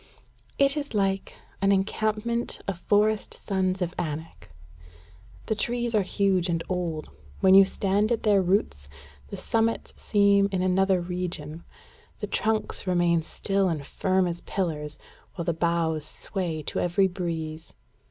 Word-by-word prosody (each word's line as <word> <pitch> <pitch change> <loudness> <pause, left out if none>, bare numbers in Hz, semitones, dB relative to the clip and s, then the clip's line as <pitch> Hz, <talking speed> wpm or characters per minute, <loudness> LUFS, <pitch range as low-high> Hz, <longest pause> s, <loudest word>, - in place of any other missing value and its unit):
"It 275 0 +4
is 285 -5 -4
like 195 -1 0 0.3
an 195 0 +4
encampment 215 +4 0
of 195 -3 -3
forest 210 +2 +1
sons 185 -2 -1
of 175 0 -4
Anak. 160 - -5 1.0
The - - 0
trees 240 +2 -1
are 215 - +4
huge 190 -2 +1
and 165 -1 0
old. 170 -4 -3 0.3
When 190 0 +6
you 195 0 +9
stand 200 +3 0
at 235 - 0
their 205 -2 +4
roots, 175 - 0 0.4
the - - -7
summits 225 0 0
seem 200 -1 +3
in 185 -1 0
another 190 0 +3
region: 175 -3 -4 0.5
the - - -4
trunks 220 -2 -1
remain 175 -2 +3
still 195 +4 0
and 150 -4 -3
firm 185 +3 +1
as 175 -1 -3
pillars, 150 -6 -3 0.4
while 170 - -4
the 170 - +1
boughs 165 -2 0
sway 165 -1 -4
to - - -3
every 175 +3 +2
breeze. 165 -4 -5
185 Hz, 145 wpm, -26 LUFS, 170-200 Hz, 1.0 s, you